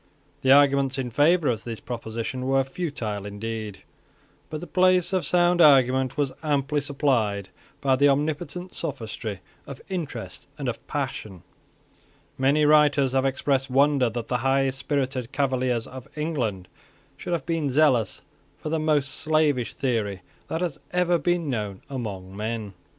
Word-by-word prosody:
The 130 - +3
arguments 140 -1 +5
in 125 -2 -3
favour 155 +5 +3
of 115 -4 0
this 115 -2 -6
proposition 120 +2 -5
were 135 0 +3
futile 130 - -4
indeed: 105 0 -6 0.7
but 155 - -4
the 175 - -7
place 185 0 +3
of 185 - +1
sound 175 0 +3
argument 130 -3 +5
was 145 -3 +1
amply 145 -1 0
supplied 120 -9 0 0.3
by 135 -1 +3
the 140 +2 +4
omnipotent 155 +6 -2
sophistry 110 - -5 0.3
of 140 - -8
interest 135 - -5
and 140 -3 -4
of 120 - -5
passion. 125 - -4 0.9
Many 140 +3 +3
writers 145 -3 +4
have 135 +1 +2
expressed 135 0 0
wonder 135 -1 +3
that 115 0 -5
the 125 - 0
high 135 +2 +2
spirited 135 -2 -2
Cavaliers 130 -4 0
of 130 -1 -10
England 120 - -2 0.5
should - - -5
have 160 -6 -2
been 165 -4 -1
zealous 130 -7 +2 0.3
for 155 - -6
the 160 +1 0
most 150 -3 +1
slavish 155 -5 +1
theory 105 -8 -1 0.2
that 160 - -3
has 170 -6 -2
ever 175 -1 +2
been 175 -2 0
known 105 -7 -3
among 100 -7 -5
men. 110 -1 -4
135 Hz, 145 wpm, -25 LUFS, 115-150 Hz, 0.9 s, arguments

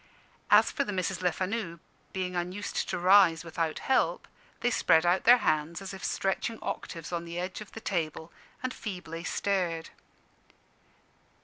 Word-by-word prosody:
As - - +6
for - - 0
the 210 - -4
Misses 185 -3 -1
Lefanu, 185 0 -1 0.3
being 185 -1 -3
unused 180 +4 -3
to - - -1
rise 180 -2 +5
without 165 -1 -2
help, 265 - +1 0.3
they 245 - +2
spread 165 -6 +4
out 175 +2 +2
their 245 +2 +9
hands 155 -5 0
as 195 0 -7
if 195 - -9
stretching 195 +4 -1
octaves 165 -1 -5
on 170 -1 -2
the 170 0 -7
edge 185 +3 -4
of 210 - -11
the 225 - -8
table, 165 -4 -3 0.3
and 255 0 -2
feebly 180 -5 -6
stared. 175 -6 -1
180 Hz, 150 wpm, -29 LUFS, 170-195 Hz, 0.3 s, their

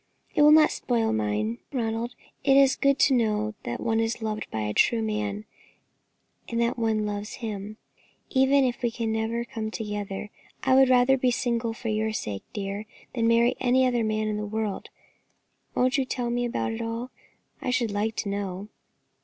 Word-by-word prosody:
"It - - +2
will 300 0 +8
not 305 0 +7
spoil 230 -3 0
mine, 105 +2 -1
Ronald; 235 -1 -2 0.3
it 275 -1 +5
is 270 -1 +6
good 275 0 +2
to 275 - +5
know 215 -3 +1
that 120 - -3
one 225 -1 0
is 225 +1 -1
loved 215 -1 -4
by 110 - -3
a 105 0 -2
true 230 - +3
man, 210 -1 -2 1.0
and 230 - -1
that 235 +1 +1
one 220 -2 +1
loves 205 0 -4
him, 215 -2 -6 0.5
even 270 +1 +4
if 245 -1 -2
we 240 - +1
can 225 -1 -3
never 225 +2 -1
come 220 -2 -4
together. 210 -2 -5 0.3
I 260 - +3
would 265 0 +6
rather 255 +1 +5
be 255 - +3
single 235 -1 0
for 230 0 -5
your 215 0 0
sake, 100 - -4
dear, 200 +1 -4 0.3
than 230 -2 +1
marry 235 +1 +4
any 260 +1 +3
other 245 -2 +1
man 215 0 0
in 210 0 -1
the 210 - -3
world. 215 -1 -3 0.9
Won't 255 +2 +2
you 265 - +1
tell 245 -2 -2
me 245 0 0
about 235 -1 -1
it 225 +1 -4
all? 230 +2 -4 0.5
I - - -2
should 245 -3 +1
like 215 +2 -1
to 205 - -2
know." 200 0 -4
225 Hz, 185 wpm, -26 LUFS, 210-245 Hz, 1.0 s, will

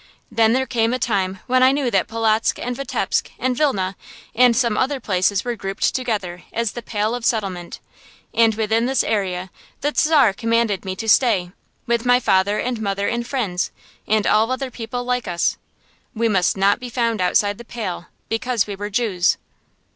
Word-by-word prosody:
Then 225 0 +3
there 260 +1 +1
came 235 -1 +1
a - - -1
time 195 -6 -1
when 255 +1 +2
I 260 +1 +6
knew 275 -3 0
that 195 -4 +2
Polotzk 225 0 +1
and 245 +1 -4
Vitebsk 275 +2 -1
and 255 -1 0
Vilna 195 -10 0 0.4
and 245 0 +5
some 235 -4 +2
other 265 +4 0
places 200 -1 0
were 240 -1 -2
grouped 195 -2 -1
together 205 -9 -3
as 230 -2 -1
the 240 - -7
"Pale 215 0 -1
of 245 -1 -4
Settlement," 195 -7 -2 0.5
and 225 -2 +4
within 225 +2 +1
this 265 0 +2
area 185 -4 -2 0.3
the 295 +2 0
Czar 290 -9 +4
commanded 230 -3 0
me 190 0 -3
to 225 +3 -6
stay, 210 -7 +3 0.3
with 235 -1 0
my 245 0 +4
father 200 -2 +2
and 245 -2 -2
mother 200 -1 -1
and 235 0 -2
friends, 210 -10 -1 0.4
and 215 -1 +2
all 220 +3 +3
other 260 0 -3
people 245 +1 -5
like 250 -2 -1
us. 175 -1 0 0.6
We 230 +1 +1
must 195 -3 +2
not 200 +3 +3
be 250 -1 -7
found 230 -3 0
outside 205 +3 +1
the - - -8
Pale, 215 -7 -5 0.2
because 225 0 0
we 205 - -5
were 205 +1 -5
Jews. 200 -5 +1
225 Hz, 185 wpm, -21 LUFS, 200-245 Hz, 0.6 s, I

